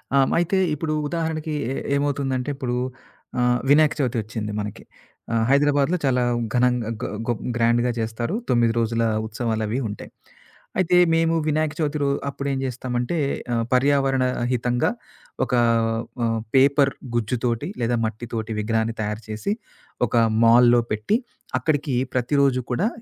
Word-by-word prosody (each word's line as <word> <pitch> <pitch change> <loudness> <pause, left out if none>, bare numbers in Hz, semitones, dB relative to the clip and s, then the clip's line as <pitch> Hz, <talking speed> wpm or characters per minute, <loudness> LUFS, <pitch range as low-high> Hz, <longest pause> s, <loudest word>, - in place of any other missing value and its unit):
ఆహ్, 135 - +6
హ్మ్. - - -2
అయితే 175 +3 +1 0.2
ఇప్పుడు 155 +1 -2
ఉదాహరణకి, 160 -1 -2 0.2
ఏ - - -1 0.2
ఏమవుతుందంటే 140 -2 -1
ఇప్పుడు 130 -3 -2 0.6
ఆహ్, 125 0 +3
వినాయక 150 +1 +5
చవితి 125 -4 0
వచ్చింది 105 0 -5
మనకి. 105 0 -6 0.5
ఆహ్, 115 -1 +2
హైదరాబాద్లో 145 +4 +3
చాలా 125 -2 +2 0.3
ఘనంగా 125 -2 +2
గ - - -2 0.2
గొ 120 - +2 0.2
గ్రాండ్‌గా 120 +1 +2
చేస్తారు. 115 - -2
9 120 -2 +3
రోజుల 115 0 0 0.2
ఉత్సవాలవి 110 +1 -2
ఉంటాయి. 105 - -8 0.7
అయితే 180 0 +3 0.2
మేము 165 0 +2
వినాయక 155 0 +1
చవితి 150 -1 0
రొ 140 - +2 0.2
అప్పుడేం 140 -1 -3
చేస్తామంటే, 125 +3 -2 0.4
ఆహ్, 115 -1 +1
పర్యావరణ 135 0 +3 0.3
హితంగా 125 - +1 0.5
ఒక 125 - -6 0.7
ఆహ్, 115 0 0 0.2
పేపర్ 140 +1 +5 0.2
గుజ్జుతోటి 120 - -1
లేదా 120 0 +1
మట్టితోటి 115 0 -4
విగ్రహాన్ని 115 +1 0
తయారు 105 +1 -3
చేసి, 110 - -2 0.5
ఒక - - -3 0.3
మాల్‌లో 120 +1 +6
పెట్టి, 110 - +1 0.4
అక్కడికి 145 -1 0 0.2
ప్రతిరోజు 130 +1 +2
కూడా 190 - +1
125 Hz, 130 wpm, -23 LUFS, 115-145 Hz, 0.7 s, ఆహ్